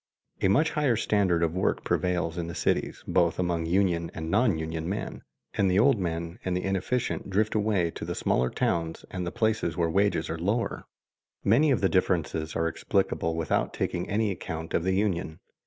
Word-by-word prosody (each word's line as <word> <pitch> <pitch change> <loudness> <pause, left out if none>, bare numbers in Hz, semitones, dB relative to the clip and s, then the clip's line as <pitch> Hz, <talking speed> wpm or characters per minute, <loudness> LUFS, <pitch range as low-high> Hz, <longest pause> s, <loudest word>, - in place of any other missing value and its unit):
A - - +4
much 135 +12 +3
higher 145 -6 +2
standard 95 -6 +2
of 80 -1 +1
work 95 - 0
prevails 90 -2 0
in 85 -2 -3
the 85 - -6
cities, - - -1
both 85 0 +2
among 85 -2 -1
union 85 -2 +1
and 80 0 -4
non 110 -4 +3
union 80 +1 -3
men, 100 - -4 0.3
and 100 -3 +2
the 90 - +2
old 120 +2 +4
men 85 -1 -3
and 90 -1 -1
the 90 - -3
inefficient 95 +5 -1
drift 105 +3 +1
away 105 -6 +1
to - - -8
the - - -3
smaller 60 +1 +1
towns 80 -1 -1
and 90 -2 -3
the - - -2
places 110 -7 0
where 85 -2 +1
wages 100 +3 +2
are 80 0 -4
lower. 105 +7 -1 0.6
Many 130 +10 +4
of 130 - +2
the 95 - +4
differences 80 -4 0
are 80 0 +1
explicable 80 0 0
without 80 -2 0
taking 85 - -2
any 105 0 +1
account 80 -3 -6
of 85 - +1
the 95 - +2
union. 90 -6 -1
90 Hz, 190 wpm, -27 LUFS, 85-105 Hz, 0.6 s, A